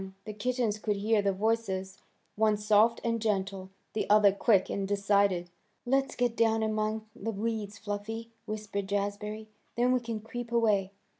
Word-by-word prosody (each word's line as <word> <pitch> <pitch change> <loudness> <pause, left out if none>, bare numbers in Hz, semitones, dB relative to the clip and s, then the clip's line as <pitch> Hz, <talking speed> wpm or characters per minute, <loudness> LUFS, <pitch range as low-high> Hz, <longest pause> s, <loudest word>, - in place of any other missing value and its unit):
The 215 - -5
kittens 225 0 -1
could 210 -1 0
hear 210 +1 +2
the 200 -1 +2
voices, 195 -2 -1 0.4
one 215 0 +3
soft 215 +2 +4
and 230 -1 0
gentle, 195 -3 -1 0.2
the 215 - -2
other 210 -1 +6
quick 200 0 +3
and 195 -1 -2
decided. 200 -3 +2 0.3
"Let's 270 +2 +1
get 245 -2 0
down 225 -1 +2
among 215 0 -1
the 225 -2 -4
weeds, 215 -1 -3
Fluffy," 220 +2 -5 0.2
whispered 210 -2 -4
Jazbury. 205 +2 -3 0.3
"Then 245 +1 +3
we 255 - +3
can 230 -2 -4
creep 235 +2 -7
away." 210 -5 +2
215 Hz, 155 wpm, -30 LUFS, 200-225 Hz, 0.4 s, other